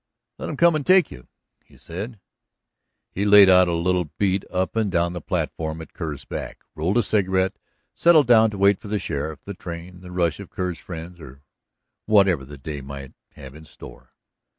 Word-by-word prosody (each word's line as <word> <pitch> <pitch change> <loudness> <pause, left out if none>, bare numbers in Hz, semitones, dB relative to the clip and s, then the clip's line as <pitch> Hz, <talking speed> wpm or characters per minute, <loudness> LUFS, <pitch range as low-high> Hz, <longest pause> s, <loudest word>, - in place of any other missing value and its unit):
"Let - - -5
'em 150 - -5
come 170 -1 +5
and 155 - -1
take 185 +3 +4
you," 60 - -12 0.4
he - - -22
said. 100 +6 -7 0.9
He 100 - -3
laid 100 -1 +7
out 90 -1 +6
a 85 - -1
little 90 +1 0
beat 95 -1 +1
up 95 +2 -2
and 110 -3 0
down 85 -1 0
the 85 - -6
platform 80 +1 -3
at 80 - -11
Kerr's 75 -5 -6
back, - - -7
rolled 90 +8 -1
a 120 - +3
cigarette, 95 -2 0 0.3
settled 165 -3 +5
down 115 -2 +5
to 105 - -7
wait 100 0 +3
for 110 - -11
the 105 +1 -1
sheriff, 75 -4 -4
the 100 - -7
train, 90 0 -9
the 90 - -11
rush 90 -3 -1
of - - -9
Kerr's 90 -3 -4
friends, 85 +1 -9
or 70 -2 -13 0.6
whatever 100 -8 +4
the 70 +2 -11
day 70 +1 -6
might 70 0 -9 0.2
have 65 -1 -11
in 80 +1 -13
store. - - -14
90 Hz, 195 wpm, -23 LUFS, 80-100 Hz, 0.9 s, laid